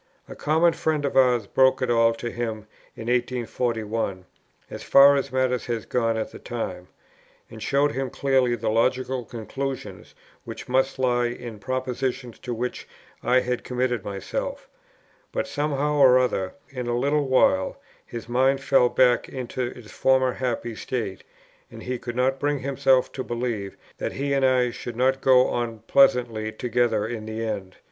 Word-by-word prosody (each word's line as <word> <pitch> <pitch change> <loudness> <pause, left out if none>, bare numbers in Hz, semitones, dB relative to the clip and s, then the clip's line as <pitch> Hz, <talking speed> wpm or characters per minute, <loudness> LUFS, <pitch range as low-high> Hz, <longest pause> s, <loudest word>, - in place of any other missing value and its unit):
A - - -9
common 160 +3 +2
friend 155 -3 -1
of 140 - -2
ours 125 -4 +4
broke 130 +5 +3
it 125 - +1
all 115 -1 +4
to 120 +1 -5
him 110 -3 -4 0.3
in 115 - -8
1841, 115 -5 -1 0.5
as - - -7
far 140 +1 +7
as 140 - -1
matters 130 -1 0
had 115 -2 -3
gone 115 -2 +1
at 110 - -3
that - - -12
time, 90 -7 -5 0.6
and 110 - -10
showed 140 +4 +2
him 135 -1 -3
clearly 130 -3 +1
the 110 -1 -2
logical 130 +2 +1
conclusions 115 -4 -6 0.3
which - - -8
must 130 +2 +1
lie 120 -2 +2
in 120 -2 -7
propositions 130 0 -3
to 125 - -6
which 120 +2 -4 0.3
I 125 +2 +3
had 125 -1 -2
committed 125 -3 -1
myself; - - -5 0.6
but - - -1
somehow 150 0 -1
or 130 -2 +7
other 110 -7 0 0.2
in 125 -3 -5
a 120 0 0
little 140 +3 +1
while, 95 -8 +2 0.2
his 115 -1 -8
mind 130 +3 +2
fell 135 -2 +3
back 125 -1 +3
into 130 0 -5
its 120 -3 -10
former 130 -1 +2
happy 120 -2 -3
state, 110 -4 -4 0.5
and - - -11
he 125 -1 -3
could 120 0 -6
not 130 +2 +1
bring 145 +1 0
himself 135 -1 +2
to 130 - -5
believe 115 -5 -3 0.2
that - - -3
he 140 +1 -2
and 135 -1 +1
I 130 -2 +3
should 120 0 -7
not 130 +2 +1
go 130 -1 +5
on 115 -2 -3
pleasantly 120 -5 +3
together 115 -2 0
to 120 -1 -4
the 110 +1 -4
end. 100 -4 -4
125 Hz, 165 wpm, -24 LUFS, 115-130 Hz, 0.6 s, far